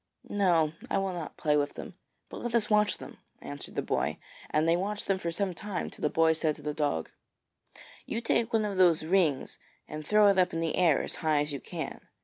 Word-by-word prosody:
'No; 170 -6 +2 0.2
I - - +1
will 195 -1 -1
not 170 -4 -6
play 150 -1 +2
with 145 -1 0
them, - - -8 0.3
but - - -9
let 240 -1 -2
us 220 -2 +1
watch 210 -1 +3
them,' - - -11 0.2
answered 70 0 -8
the - - -1
boy, - - -1 0.3
and 155 +1 +1
they 165 - +4
watched 205 +4 -2
them 195 -1 0
for 170 -2 -2
some 190 +2 -1
time, 205 +1 -4
till - - -11
the 150 - +2
boy 160 +1 +4
said 155 -1 0
to 150 - -14
the 150 0 -2
dog: 145 - -1 1.0
'You 225 - -2
take 230 0 +1
one 220 -2 +2
of 200 -2 -3
those 175 -4 +5
rings 165 -6 +1 0.3
and 155 0 -6
throw 210 +5 +5
it 195 -1 +3
up 180 0 +2
in 165 - -1
the 165 -1 -1
air 170 -6 +3
as - - -3
high 155 -2 +2
as 150 0 -3
you 140 - -3
can.' - - -6
170 Hz, 230 wpm, -29 LUFS, 155-200 Hz, 1.0 s, those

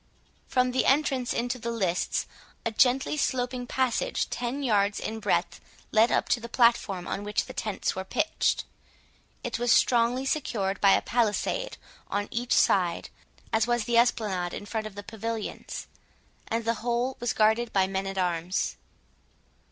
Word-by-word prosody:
From 255 -1 +2
the 255 - +1
entrance 270 -3 +2
into 245 +1 -1
the 235 - -4
lists, 190 -7 0 0.4
a 230 - 0
gently 265 +5 +3
sloping 250 -2 -1
passage, 260 - 0
ten 250 +4 -3
yards 205 -4 +2
in 220 0 -4
breadth, 210 - 0 0.3
led 225 +2 +4
up - - +1
to 245 - +3
the 235 0 -8
platform 230 -7 +2
on 200 - -3
which 210 0 -1
the - - -9
tents 210 -3 -2
were 190 - -3
pitched. 315 +11 0 0.8
It 240 -1 -3
was 240 -1 +2
strongly 245 +2 +3
secured 205 -9 -1
by 195 -1 +6
a - - +2
palisade 240 - 0 0.3
on 205 +1 -2
each 240 +1 -1
side, 175 -3 +2 0.4
as 225 +1 +3
was 240 -1 +1
the 235 +1 +3
esplanade 205 -7 +1
in - - -7
front 215 0 -3
of 205 - -12
the 205 - -7
pavilions, 225 0 -5 0.6
and 230 0 -2
the 230 - +2
whole 245 +2 0
was 240 -1 0
guarded 220 +2 +2
by 195 -1 +3
men 190 0 -2
at 195 0 -5
arms. 175 0 -1
230 Hz, 160 wpm, -27 LUFS, 205-245 Hz, 0.8 s, by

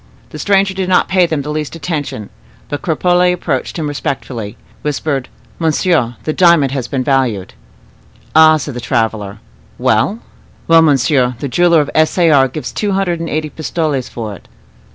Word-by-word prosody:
The - - -8
stranger 195 -1 +2
did 190 -1 -3
not 185 - +3
pay 185 -2 +3
them 155 -4 -2
the 150 - -4
least 150 +1 -4
attention; 145 - -4 0.4
but 145 - -4
Cropole 180 +2 +2
approaching 165 -2 -3
him - - -2
respectfully, 130 -6 -4 0.2
whispered, 145 -2 -2 0.3
"Monsieur, 160 -6 +1
the 155 - -2
diamond 170 -7 +4
has 130 -3 -3
been 130 -2 -2
valued." 125 -9 0 0.8
"Ah!" 155 0 +7
said 145 -1 -5
the 120 - -6
traveler. 110 -5 -1 0.4
"Well?" 110 - +1 0.5
"Well, 165 0 +6
monsieur, 135 -4 +2
the 140 - -4
jeweler 170 +4 +3
of 145 - -4
S. 155 +3 +2
A. 170 -3 +4
R. 135 -2 +5
gives 145 +4 -6
two 205 -2 -2
hundred 185 -3 0
and 165 - -4
eighty 155 0 -2
pistoles 155 -5 -2
for 110 -3 -6
it." 95 - -14
150 Hz, 170 wpm, -15 LUFS, 130-170 Hz, 0.8 s, Ah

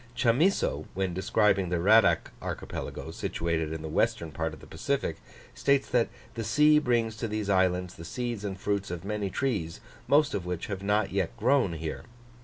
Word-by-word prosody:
Chamisso, 125 - +2
when 95 -1 -1
describing 95 0 +2
the 90 -1 0
Radack 110 +6 +4
Archipelago, - - -5
situated 80 -2 -2
in 80 -1 -5
the - - -4
western 80 +1 0
part 80 +1 -2
of 80 - -11
the - - -13
Pacific, - - -2 0.4
states 140 -1 +2
that 120 -2 +3 0.2
"the 115 - -4
sea 150 +7 +5
brings 120 -5 +1
to 115 - -2
these 105 -1 -2
islands 90 -1 +2
the 85 - -10
seeds 120 +4 -4
and 100 -2 -4
fruits 100 0 -1
of 90 +1 -5
many 105 -1 -2
trees, 100 -10 -2 0.3
most 145 +1 +4
of 100 - -2
which 90 -1 -3
have 100 -2 -5
yet 105 0 +1 0.2
not 120 - -24
grown 125 -8 +3
here. 80 -1 -5
100 Hz, 180 wpm, -28 LUFS, 85-115 Hz, 0.4 s, sea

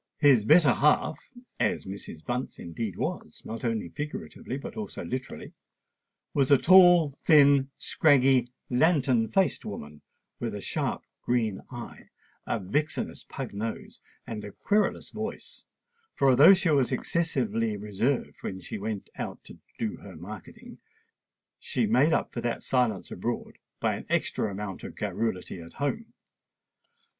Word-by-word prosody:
His 135 -8 +5
better 150 -1 +6
half—as 150 - 0
Mrs. 95 -5 -8
Bunce 125 +1 -3
indeed 95 +4 -5
was, - - -5
not 115 +2 -6
only 115 -6 -1
figuratively, 145 - -6
but 140 - -8
also 215 -2 -6
literally—was 130 +1 -6
a 140 - +7
tall, 175 -3 +7
thin, 140 -3 +5
scraggy, 135 -4 +3 0.2
lantern 130 -4 +3
faced 190 - +1
woman, 75 -7 -8 0.4
with - - -3
a - - -4
sharp - - -2 0.2
green 115 -5 0
eye, 120 -2 -9 0.4
a - - 0
vixenish 140 +11 -2
pug 135 -6 -6
nose, 110 +3 -5 0.3
and 110 -2 -6
a 100 - -7
querulous 210 - 0
voice; 220 +2 -7 0.5
for 135 -1 +4
although 145 +10 +8
she 185 -3 +1
was 135 -3 +3
excessively 120 -7 0
reserved 105 +6 -1
when 95 - -5
she 95 - -7
went 105 -1 -4
out - - -5
"to - - -13 0.2
do 110 -2 -3
her 95 -3 -12
marketing," 110 - -10 0.8
she 470 - -1
made 210 -8 +4
up - - 0
for 120 - -3
that 120 0 -2
silence 120 -7 0
abroad - - -4 0.2
by - - 0
an - - -10
extra 110 - 0
amount 100 -1 -6
of - - -8
garrulity 95 -5 -3
at 85 - -12
home. 145 +11 -3
125 Hz, 135 wpm, -28 LUFS, 105-150 Hz, 0.8 s, although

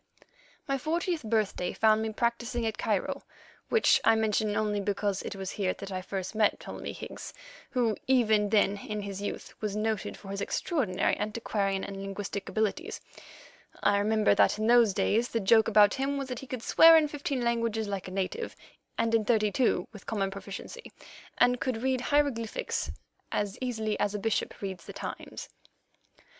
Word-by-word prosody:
My 275 -1 0
fortieth 335 +3 -1
birthday 215 -5 0
found 220 0 +4
me 220 - -1
practising 235 +1 -1
at 220 - -3
Cairo, - - -1 0.5
which 455 - +4
I 225 - +5
mention 215 -1 +1
only 210 -1 0
because 200 0 -1
it - - -6
was 190 -1 -5
here 190 -3 -1
that 190 -2 -6
first 195 +1 -4
I - - -5
met 210 - +3
Ptolemy - - -6
Higgs, - - -8 0.3
who, 235 -4 +1
even 220 -5 +3
then 205 -1 +3
in 210 +1 -4
his 200 -1 -5
youth, 205 - -5
was 210 -2 -2
noted 215 -1 -2
for 195 - -12
his 200 0 -4
extraordinary 205 - 0
antiquarian 205 -2 -1
and 195 -1 -6
linguistic 195 0 -5
abilities. 220 - -1 0.8
I 200 0 +4
remember 215 0 +3
that 200 - +4
in 215 - -1
those 230 -4 +5
days 230 +3 +2
the 230 - -1
joke 220 +2 +5
about 210 -2 +6
him 280 +1 -1
was 275 -1 -4
that 250 -1 -4
he 270 - -10
could 250 -3 -5
swear 330 0 +8
in 310 -1 +3
fifteen 285 -3 -3
languages 230 -2 0
like 195 -3 -4
a - - -7
native 195 - -3 0.4
and 230 0 +1
in 225 -1 +4
thirty 215 -2 +2
two 210 -6 +1
with 210 - -12
common 195 -3 -1
proficiency, 200 - -8 0.5
and 245 0 +3
could 245 -3 -2
read 260 -1 +1
hieroglyphics 270 -6 0 0.4
as 205 -1 -1
easily 220 -4 -2
as 205 0 0
a - - 0
bishop 220 +1 -2
reads 190 -3 -5
the - - -8
Times. - - -7
215 Hz, 175 wpm, -29 LUFS, 200-240 Hz, 0.8 s, swear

